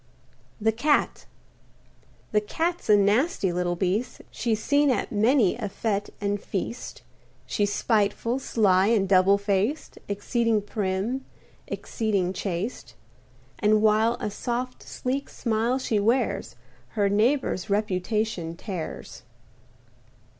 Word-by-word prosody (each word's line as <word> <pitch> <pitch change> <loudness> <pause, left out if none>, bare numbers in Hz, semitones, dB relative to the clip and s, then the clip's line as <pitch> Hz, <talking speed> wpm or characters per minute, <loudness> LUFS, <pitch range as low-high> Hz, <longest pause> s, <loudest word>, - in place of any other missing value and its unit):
THE 220 +1 +2
CAT 290 +7 +1 1.0
The 210 - +3
Cat's 330 +8 -2
a 210 - +7
nasty 205 - +2
little 175 0 0
beast; 190 +7 -1
She's 225 -3 -1
seen 285 +5 +3
at 255 - 0
many 220 -1 +3
a 220 -4 -4
fęte 205 0 -2
and 205 0 -1
feast. 220 +5 -5 0.4
She's 205 -1 0
spiteful, 220 +3 +1
sly 195 -7 +3
and 215 -4 +2
double 190 +1 +5
faced, 200 +8 -1
Exceeding 220 +1 0
prim, 205 +5 -2 0.4
exceeding 200 -5 -1
chaste. 175 - -4 0.6
And 215 +1 +3
while 220 +2 +4
a 210 - -3
soft, 250 +3 -3
sleek 265 +2 -3
smile 230 +2 0
she 230 -5 0
wears, 230 +6 0 0.4
Her 205 -1 +3
neighbor's 210 -1 +1
reputation 200 -3 -1
tears. 180 -3 -6
210 Hz, 110 wpm, -26 LUFS, 200-235 Hz, 1.0 s, a